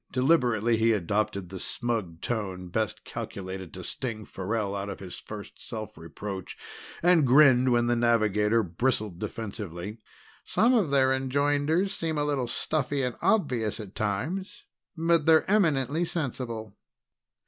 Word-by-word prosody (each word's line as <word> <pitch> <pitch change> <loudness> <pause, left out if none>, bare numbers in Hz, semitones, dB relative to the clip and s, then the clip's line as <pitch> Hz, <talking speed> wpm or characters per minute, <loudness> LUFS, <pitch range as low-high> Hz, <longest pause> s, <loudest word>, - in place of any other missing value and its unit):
Deliberately 125 -5 +3
he 115 +1 +4
adopted 100 -1 -1
the 95 0 -7
smug 110 -10 -3
tone 95 -6 -3
best 110 +3 -2
calculated 95 -2 -6
to 90 - -7
sting 115 0 -4
Farrell 100 +1 -2
out 100 0 -3
of 100 - -6
his 95 -2 -8
first 105 -1 -9
self 110 -2 -6
reproach, 95 +4 -7 0.5
and 170 -5 +5
grinned 130 -2 +6
when 120 0 +3
the 120 0 +2
navigator 110 -2 +3
bristled 105 0 -1
defensively. 100 -1 -6 0.4
"Some 240 +3 +3
of 210 - +3
their 135 -1 +4
enjoinders 145 +7 +1
seem 160 -2 -2
a 145 - +1
little 140 -4 0
stuffy 140 +1 -1
and 125 -1 -1
obvious 125 - +1
at 105 -2 -8
times, 130 - -3 0.3
but 165 -1 +2
they're 160 -1 +5
eminently 160 - +2
sensible." 120 - -4
115 Hz, 135 wpm, -27 LUFS, 100-145 Hz, 0.5 s, grinned